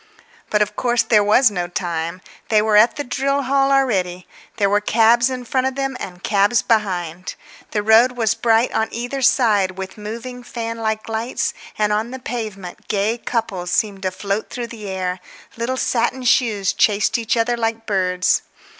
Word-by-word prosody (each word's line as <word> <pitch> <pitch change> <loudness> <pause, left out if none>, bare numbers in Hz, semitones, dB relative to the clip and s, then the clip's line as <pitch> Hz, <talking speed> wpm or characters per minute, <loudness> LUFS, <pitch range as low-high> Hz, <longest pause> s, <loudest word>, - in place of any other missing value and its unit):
But, 210 0 +3
of 210 - -7
course, 240 -1 +1
there 220 -3 +4
was 215 +3 +4
no 175 -3 -2
time. 170 0 -3 0.3
They 215 - +4
were 215 0 +2
at 215 +3 +6
the 290 - -3
drill 275 +2 -1
hall 275 +1 +2
already; 190 -10 +1 0.3
there 200 - +2
were 205 +1 +2
cabs 235 +3 +4
in 255 -1 -5
front 260 +2 0
of 265 - -3
them 270 -1 -2
and 180 -1 -8
cabs 205 +3 +2
behind. 185 -6 -1 0.3
The 210 - -2
road 225 +4 +5
was 225 -3 +1
bright 230 +1 +2
on 220 - +1
either 245 +4 -4
side 205 -7 +3
with 190 +2 -7
moving 235 +4 -7
fan 230 -1 -5
like 220 -1 -2
lights, 240 +8 -2 0.2
and 210 -1 +1
on 215 +3 -1
the 260 - -6
pavement 215 -8 -6
gay 215 +3 0
couples 195 -7 -3
seemed 200 +1 0
to 190 - 0
float 200 +3 -3
through 240 -2 -5
the 210 -3 -8
air; 185 -1 -3 0.4
little 235 +3 -2
satin 255 +1 0
shoes 215 -6 +2
chased 210 +2 +2
each 230 +1 -1
other 235 +1 +1
like 225 -1 -2
birds. 185 -3 +1
220 Hz, 180 wpm, -20 LUFS, 200-240 Hz, 0.4 s, at